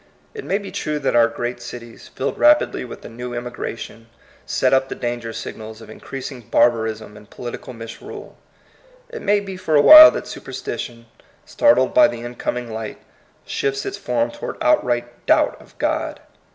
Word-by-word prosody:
It 430 - -7
may 195 - 0
be 200 -1 -8
true 150 0 -3
that 145 - -1
our 115 -1 +6
great 120 +1 -5
cities, 120 -1 -10
filled 135 - -4
rapidly 300 0 +4
with 125 - -10
a - - -6
new 120 +1 -7
emigration, 115 -1 -6 0.4
set 130 0 +1
up 135 0 +2
the - - -4
danger 120 -1 -4
signals 110 0 -8
of 110 - -12
increasing 135 -1 -8
barbarism 110 -2 +1
and 105 -1 -15
political 120 +1 -8
misrule. 115 -1 -10 0.7
It 470 -1 -8
may 205 0 +2
be 195 -2 -7
for 160 -4 -1
a 145 - +7
while 310 0 +12
that - - -5
superstition, 120 - -7 0.4
startled 125 +2 +3
by - - +7
the 120 -1 -6
incoming 120 -1 -4
light, 110 -1 -6 0.5
shifts 135 0 -2
its 200 - -5
form 120 -9 -1
toward - - -7
outright 120 - 0
doubt - - +2
of - - -20
God. - - -2
120 Hz, 165 wpm, -21 LUFS, 115-140 Hz, 0.7 s, while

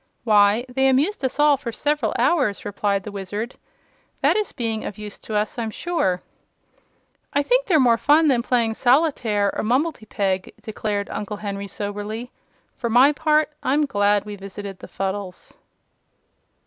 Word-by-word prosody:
"Why, 210 +1 +4
they 265 +2 +1
amused 280 +8 +1
us 260 0 -1
all 295 -1 +5
for 255 -4 -5
several 290 -2 -1
hours," 255 - +1
replied 200 -1 -1
the 210 - -7
Wizard. 205 +5 -5 0.7
"That - - +3
is 425 -2 0
being 225 -2 -3
of 205 - -6
use 210 -1 -7
to 220 - -6
us, 210 +3 -1
I'm 225 -1 -2
sure." 210 - -1 1.1
"I 285 - +2
think - - +2
they're 335 -6 +4
more 235 -4 +4
fun 310 +2 +4
than 255 -4 +3
playing 235 -2 +1
solitaire 245 -6 +2
or - - -2
mumbletypeg," 215 - -1
declared 210 -2 -3
Uncle 210 0 -4
Henry, 200 -1 -5
soberly. 210 +4 -5 0.4
"For 235 - -3
my 250 +5 +6
part, 305 0 +2
I'm 295 +3 +2
glad 205 -4 +2
we 210 -1 -6
visited 195 0 -8
the - - -10
Fuddles." 195 -1 -5
225 Hz, 155 wpm, -22 LUFS, 205-275 Hz, 1.1 s, my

